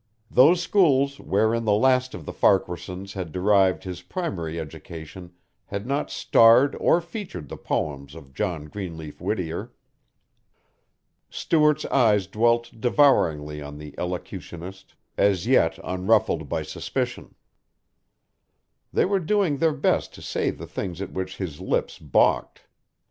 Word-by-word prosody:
Those 155 +8 +6
schools 140 -8 +3
wherein 110 +3 +1
the 105 - +3
last 130 +2 +2
of 85 -4 -9
the - - -6
Farquaharsons 95 0 0
had 90 -5 -5
derived 95 +1 +2
his 90 -2 -6
primary 85 - -4
education 80 +3 -9 0.4
had 100 +1 -5
not 140 +3 -1
starred 115 +5 +5
or 175 - +3
featured 170 - -7
the - - -6
poems 70 0 -3
of 70 -5 -13
John 80 +1 -3
Greenleaf 80 -3 -8
Whittier. 85 -6 -3 1.6
Stuart's 150 -2 +2
eyes 110 -7 +3
dwelt 120 +4 +1
devouringly 80 - +2
on 75 0 -8
the 75 0 -10
elocutionist 90 +1 -7 0.2
as 100 -3 +2
yet - - +3
unruffled 95 +4 +1
by - - -2
suspicion. - - -4 1.6
They - - +2
were 195 +1 +1
doing 185 -4 +1
their 160 0 +3
best - - 0
to - - -12
say - - -1
the - - -6
things 90 -3 -5
at 100 - -5
which 95 0 -5
his 85 -7 -6
lips - - -2
balked. 75 -5 +1
95 Hz, 130 wpm, -24 LUFS, 85-130 Hz, 1.6 s, Those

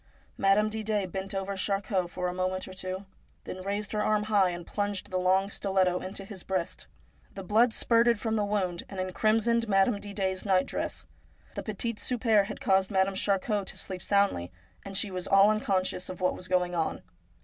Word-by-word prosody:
1 - - -35 0.3
Madame 195 +2 +4
Didet 215 -3 -2
bent 195 +1 -3
over 195 +1 -2
Charcot 195 -1 -1
for 180 0 -3
a 180 - -2
moment 185 0 -2
or 190 - -9
two, 185 +1 -4 0.4
then 185 - -7
raised 200 +2 -3
her 210 - 0
arm 210 0 +2
high 205 -3 +3
and 175 -1 -6
plunged 205 -1 -3
the 185 - 0
long 190 +2 +3
stiletto 190 -3 +1
into 195 +1 -6
his 195 -2 -8
breast. 170 - -3 0.5
The 195 - -6
blood 225 +5 +4
spurted 230 0 +3
from 225 0 -1
the 210 - +1
wound 195 -4 -1
and 195 - -6
encrimsoned 225 +5 +1
Madame 195 +2 +3
Didet's 195 -2 -2
night 190 -2 +3
dress. - - -4 0.5
The - - -4
petit 215 +1 -3
souper 225 -5 +2
had - - -7
caused 190 -1 +2
Madame 195 0 +2
Charcot 200 +1 0
to - - -7
sleep 185 -2 -5
soundly, 200 - +1 0.3
and 195 -1 -4
she 200 - -1
was 185 -1 -4
all 195 +1 +6
unconscious 190 -3 -1
of 185 - -7
what 180 0 +2
was 185 - -9
going 180 -1 +1
on. 165 -2 -1
195 Hz, 195 wpm, -29 LUFS, 185-210 Hz, 0.5 s, all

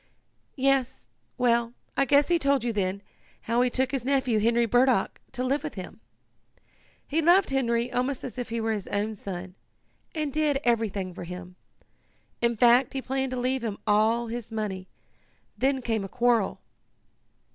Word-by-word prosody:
"Yes. 265 - +1 0.3
Well, 235 -1 +2 0.2
I 275 - +3
guess 285 +2 +4
he 345 -1 +2
told 280 -4 +2
you 240 -1 -1
then, 200 -1 -1 0.4
how 235 +2 +1
he 250 - +3
took 260 +1 0
his 270 -4 -2
nephew, 260 -4 +1
Henry 235 +2 +3
Burdock, 245 -2 +2
to 250 - -2
live 275 +3 0
with - - -5
him. - - -8 1.1
He 315 +3 +1
loved 350 +1 +4
Henry 240 -2 0
almost 255 +2 -1
as 255 0 -6
if 245 - -4
he 230 0 -2
were 225 0 0
his 205 -3 -5
own 210 +2 -1
son, 185 -3 -7 0.6
and 305 -3 -2
did 300 -2 +1
everything 210 -6 0
for 175 - -7
him. 180 +1 -8 0.9
In 235 -1 +1
fact 245 +2 +5
he 270 - -2
planned 265 0 -1
to 255 0 -3
leave 255 0 -1
him 215 -3 -3
all 220 +3 +3
his 235 0 -6
money. 200 -4 -4 0.7
Then 265 -1 0
came 225 -3 -1
a 195 - -6
quarrel." 235 -4 +1
240 Hz, 170 wpm, -27 LUFS, 220-265 Hz, 1.1 s, fact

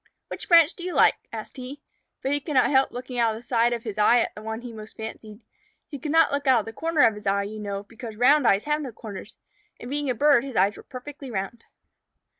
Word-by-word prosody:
"Which - - -7
branch 335 -1 +6
do 350 - -10
you 360 0 -4
like?" - - +6 0.2
asked - - -8
he. 260 +3 -8 0.4
But 270 - -1
he 290 - +1
could 295 0 -5
not 255 - +4
help 265 -1 +4
looking 250 0 -6
out 225 -2 +2
of - - -7
the 240 - -18
side 235 -1 +2
of 235 -1 -3
his 215 -2 -5
eye 220 +3 +5
at - - -2
the 210 - -10
one 220 +1 -5
he 240 -1 -8
most 215 0 -11
fancied. 220 0 -8 0.5
He 285 - -8
could 295 +2 -4
not 325 0 +4
look 285 0 -2
out 255 -4 +5
of - - -12
the 225 - -8
corner 325 +3 0
of 225 - +5
his 210 -1 -9
eye, 200 +1 +2
you 215 +2 -7
know, 200 -1 -4
because 225 +1 -10
round 260 +3 +4
eyes 200 +1 +3
have 300 +1 0
no 270 -4 -5
corners, 210 -2 -9 0.4
and 245 - -8
being 290 -1 -2
a 250 - 0
bird 285 -1 +4
his 270 -3 -7
eyes 195 +3 +3
were - - -11
perfectly 270 +2 -9
round. 215 +2 -5
245 Hz, 260 wpm, -25 LUFS, 215-285 Hz, 0.5 s, branch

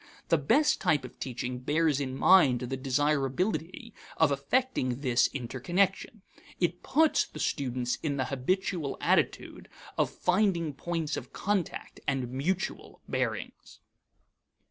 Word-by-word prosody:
The 165 - +4
best 290 - +3
type 145 -4 +2
of 125 - -12
teaching 125 -1 -4
bears 150 +2 +1
in 130 -2 -3
mind 140 -11 +5
the 125 +1 -3
desirability 150 - -1 0.2
of 160 -3 +4
affecting 140 - 0
this 125 -4 +3
interconnection. 175 - -1 0.4
It 175 0 0
puts 315 +2 +3
the - - -12
student 125 -4 -1
in 145 -3 -1
the 130 - 0
habitual 155 +2 -1
attitude - - 0 0.3
of - - +3
finding 180 -5 +1
points 160 +1 -3
of - - -8
contact 200 -5 -2
and 130 -3 -1
mutual 170 +9 -3
bearings. - - -4
145 Hz, 120 wpm, -29 LUFS, 130-185 Hz, 0.4 s, mind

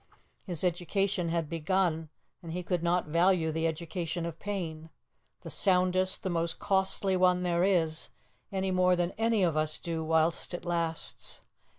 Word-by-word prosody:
His 175 -3 -4
education 180 +1 0
had 165 -1 0
begun, 165 0 0 0.3
and 165 -2 -7
he 180 +1 -3
could 175 -1 -1
not 175 +1 +1
value 170 +1 +3
the 160 +1 0
education 170 +1 -3
of 170 -1 -6
pain 165 -6 -4 0.5
the - - -8
soundest, 185 -1 +2
the 190 - -1
most 165 -1 -1
costly 190 0 +1
one 180 0 +3
there 175 0 +2
is 165 -5 +1 0.4
any 190 -1 -1
more 185 0 +4
than 175 0 0
any 225 -3 +2
of 170 -3 +2
us 155 0 +1
do 165 -1 -3
whilst 160 +2 +1
it 175 - -8
lasts. 170 -2 -2
175 Hz, 160 wpm, -30 LUFS, 165-185 Hz, 0.5 s, more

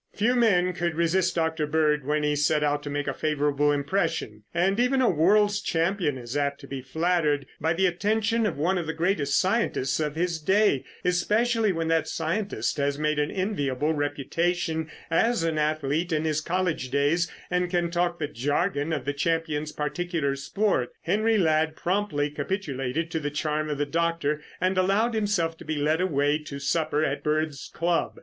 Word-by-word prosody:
Few 225 +4 +2
men 185 -7 +3
could 175 -2 -2
resist 170 +2 +1
Dr. 160 -2 0
Bird 150 -2 +1
when 150 0 +1
he 150 0 +1
set 150 +1 +2
out 145 0 +1
to 145 - -6
make 145 0 -2
a 140 - 0
favorable 145 0 +1
impression, 140 - -1
and 190 +5 +1
even 250 +2 +3
a 255 - +4
world's 205 +5 +3
champion 165 -5 0
is 120 +1 -7
apt 140 -1 0
to - - -11
be 135 -1 -5
flattered 150 0 0
by 160 +2 +1
the 190 +3 +1
attention 215 +5 +1
of - - -3
one 180 +5 +1
of 165 - -4
the 160 - -3
greatest 160 -5 +1
scientists 185 - 0
of 150 -1 -1
his 170 0 -1
day, 190 -4 +3 0.2
especially 215 +5 +2
when 165 -2 -2
that 165 -1 +2
scientist 165 - -2
has 140 0 0
made 150 0 0
an 150 - +1
enviable 155 -7 -1
reputation 160 +3 -1 0.2
as 225 +3 +2
an 160 -2 0
athlete 155 +2 0
in 155 0 0
his 155 -1 0
college 170 -5 -1
days 145 +5 +1 0.2
and 180 0 +1
can 175 -1 0
talk 175 0 0
the 150 - -2
jargon 145 - -1
of 145 -6 -2
the 145 - -1
champion's 155 0 -1
particular 150 -1 -2
sport. 140 - 0
Henry 215 +5 +2
Ladd 155 -3 +2
promptly 175 -6 -1
capitulated 150 -2 -3
to 160 - -1
the 145 -1 -2
charm 150 +1 -2
of 150 - -2
the 145 - 0
doctor 165 -1 0 0.2
and 185 0 +1
allowed 200 +6 +2
himself 205 -7 0
to - - -9
be 155 - -3
led 155 +3 +1
away 145 -4 +1
to 150 -2 -8
supper 155 +2 0
at 140 - -2
Bird's 150 -2 -1
club. 170 0 -1
160 Hz, 180 wpm, -26 LUFS, 145-180 Hz, 0.2 s, a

